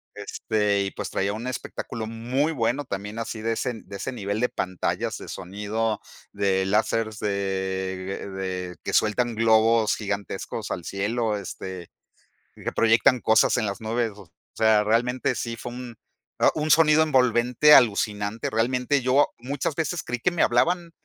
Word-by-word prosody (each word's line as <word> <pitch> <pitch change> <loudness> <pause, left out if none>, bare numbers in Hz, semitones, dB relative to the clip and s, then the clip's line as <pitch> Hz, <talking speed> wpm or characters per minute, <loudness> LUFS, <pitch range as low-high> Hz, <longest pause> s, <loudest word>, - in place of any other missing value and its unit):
Este, 105 0 0
y 100 - -3
pues, 100 -2 -5
traía 100 +1 -1
un 110 +3 -6
espectáculo 115 -3 -5
muy 125 +7 -1
bueno 125 +2 0
también 105 0 -5
así 115 -1 -4
de 115 +1 -1
ese 125 +2 -2
de 100 - -8
ese 115 - -4
nivel 100 -2 -3
de 125 - +2
de - - -23
pantallas, 95 -1 -2
de - - -10
sonido, 105 +3 -3 0.3
de 95 -2 +1
lásers 110 +2 0
de 105 - -2 1.0
de 95 -2 -4
que - - -4
sueltan 115 +2 +2
globos 110 0 +4
gigantescos 100 -3 -4
al 85 - -4
cielo, 105 +2 -1
este, 95 -2 -7 0.7
y - - -14
que - - -2
proyectan 115 +2 +4
cosas 110 0 +4
en 120 -3 0
las 100 -1 -4
nubes, 115 +1 -1
o 100 -4 -14 0.3
sea, 110 -1 +4
realmente 125 +4 +1
sí 115 -1 -3
fue 120 +1 -7
un 120 -1 -8 0.6
un 155 0 -1
sonido 160 -1 +6
envolvente 125 0 +4
alucinante. 105 -2 +2
Realmente 125 +5 +1
yo 130 +3 +3
muchas 140 +4 -3
veces 165 +1 -1
creí 125 - -4
que 175 +9 +1
me 175 - +1
hablaban 170 +8 +2
115 Hz, 160 wpm, -25 LUFS, 105-125 Hz, 1.0 s, sonido